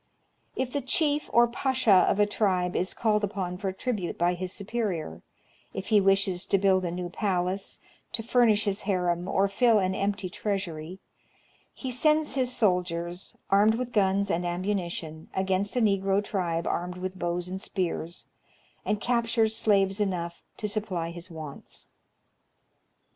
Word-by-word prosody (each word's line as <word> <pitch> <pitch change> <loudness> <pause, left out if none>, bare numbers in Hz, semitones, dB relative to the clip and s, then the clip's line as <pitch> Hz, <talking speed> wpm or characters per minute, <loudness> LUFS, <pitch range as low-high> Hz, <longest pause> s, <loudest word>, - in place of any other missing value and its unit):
If 255 -1 -2
the 285 - 0
chief 295 +3 +1
or 240 0 +6
pacha 255 -1 +1
of 195 +1 +5
a 205 - +6
tribe 185 -4 0
is 185 - 0
called 215 -2 +1
upon 185 -3 -3
for 195 -2 -1
tribute 195 -2 -3
by 175 +1 +2
his 180 +1 -4
superior, 195 - -3 0.5
if 195 - -5
he 210 -2 +5
wishes 195 -2 +2
to 195 - +3
build 190 -1 +3
a - - -1
new 175 +1 -4
palace, 185 0 -1 0.3
to 225 - -1
furnish 230 -3 +3
his 200 0 -1
harem, 180 -3 0
or 195 +1 +2
fill 225 +3 +4
an 190 -2 +1
empty 200 0 -1
treasury, 180 -4 -4 0.7
he 260 - -5
sends 305 +5 +3
his 255 -2 0
soldiers, 180 -5 -1 0.2
armed 210 +3 +5
with 245 0 -4
guns 200 -1 +2
and 175 - 0
ammunition, 175 -3 -3
against 190 +2 0
a 250 - +2
Negro 195 -1 +2
tribe 170 -5 -2
armed 180 +1 -2
with 185 0 -5
bows 175 0 -2
and 190 +1 -5
spears, 175 -4 -3 0.6
and 210 -1 0
captures 230 -2 +1
slaves 200 -3 +2
enough 175 -4 -2 0.2
to 210 - -2
supply 200 -6 -2
his 175 +2 -9
wants. 155 -4 -9
195 Hz, 155 wpm, -27 LUFS, 180-215 Hz, 0.7 s, or